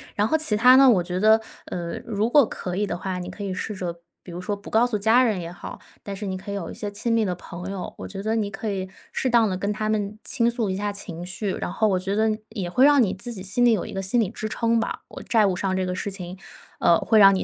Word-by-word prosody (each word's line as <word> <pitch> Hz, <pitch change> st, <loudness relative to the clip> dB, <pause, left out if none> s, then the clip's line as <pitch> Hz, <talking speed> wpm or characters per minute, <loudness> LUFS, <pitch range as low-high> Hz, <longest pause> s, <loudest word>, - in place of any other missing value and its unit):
然 205 Hz, +1 st, +2 dB
后 315 Hz, -, +2 dB
其 300 Hz, -9 st, 0 dB
它 250 Hz, +4 st, +7 dB
呢， 270 Hz, 0 st, +8 dB
我 205 Hz, -7 st, +4 dB
觉 180 Hz, +1 st, -2 dB
得， 220 Hz, +2 st, +6 dB, 0.3 s
呃， 170 Hz, -1 st, -4 dB
如 215 Hz, 0 st, 0 dB
果 280 Hz, -1 st, +6 dB
可 180 Hz, -1 st, -5 dB
以 205 Hz, +2 st, +1 dB
的 175 Hz, -, -3 dB
话， 185 Hz, 0 st, -4 dB
你 180 Hz, 0 st, -6 dB
可 205 Hz, +2 st, -7 dB
以 195 Hz, -2 st, -3 dB
试 210 Hz, +3 st, -4 dB
着 170 Hz, -2 st, -5 dB, 0.2 s
比 180 Hz, -, -11 dB
如 170 Hz, -, -6 dB
说 205 Hz, +3 st, -2 dB
不 200 Hz, -, -11 dB
告 225 Hz, +2 st, +4 dB
诉 230 Hz, -4 st, 0 dB
家 225 Hz, +5 st, +5 dB
人 215 Hz, -6 st, +1 dB
也 170 Hz, 0 st, -6 dB
好， 175 Hz, -, -9 dB, 0.2 s
但 200 Hz, -, -5 dB
是 205 Hz, +2 st, -5 dB
你 190 Hz, -1 st, -3 dB
可 200 Hz, +2 st, -8 dB
以 -, -, -3 dB
有 185 Hz, -5 st, -4 dB
一 -, -, -7 dB
些 205 Hz, -, -4 dB
亲 215 Hz, +3 st, -2 dB
密 225 Hz, -1 st, +3 dB
的 180 Hz, -, -1 dB
朋 180 Hz, +2 st, -8 dB
友， 190 Hz, -2 st, -5 dB
我 -, -, -7 dB
觉 195 Hz, 0 st, -6 dB
得 220 Hz, +2 st, 0 dB
你 205 Hz, -2 st, -1 dB
可 210 Hz, +2 st, -4 dB
以 190 Hz, -1 st, -3 dB, 0.2 s
适 260 Hz, -, -1 dB
当 230 Hz, -3 st, +4 dB
地 185 Hz, -, -2 dB
跟 200 Hz, +3 st, -1 dB
他 215 Hz, 0 st, -2 dB
们 210 Hz, -1 st, -1 dB
倾 235 Hz, 0 st, +1 dB
诉 230 Hz, -4 st, -1 dB
一 185 Hz, -, -1 dB
下 205 Hz, +1 st, -1 dB
情 175 Hz, -4 st, -7 dB
绪， 195 Hz, +2 st, -3 dB
然 -, -, -4 dB
后 220 Hz, -, +1 dB
我 190 Hz, -2 st, +2 dB
觉 195 Hz, +2 st, -2 dB
得 215 Hz, 0 st, +2 dB
也 200 Hz, -6 st, -4 dB
会 255 Hz, +9 st, +4 dB
让 290 Hz, -2 st, +6 dB
你 205 Hz, -6 st, +2 dB
自 235 Hz, +5 st, -6 dB
己 190 Hz, -, -5 dB
心 205 Hz, +6 st, +1 dB
里 240 Hz, -, +6 dB
有 210 Hz, -, +1 dB
一 -, -, -8 dB
个 195 Hz, -, -2 dB
心 195 Hz, +6 st, +1 dB
理 200 Hz, -, 0 dB
支 215 Hz, 0 st, -5 dB
撑 230 Hz, +1 st, +1 dB
吧。 -, -, -3 dB
我 -, -, -10 dB
债 220 Hz, -3 st, +3 dB
务 190 Hz, -, +1 dB
上 190 Hz, 0 st, -1 dB
这 185 Hz, 0 st, 0 dB
个 180 Hz, 0 st, -2 dB
事 200 Hz, +1 st, -3 dB
情， 185 Hz, -1 st, -6 dB, 0.4 s
呃， 170 Hz, -, +5 dB
会 225 Hz, -, +2 dB
让 195 Hz, -2 st, +8 dB
你 190 Hz, -, 0 dB
205 Hz, 325 characters per minute, -24 LUFS, 185-220 Hz, 0.4 s, 呢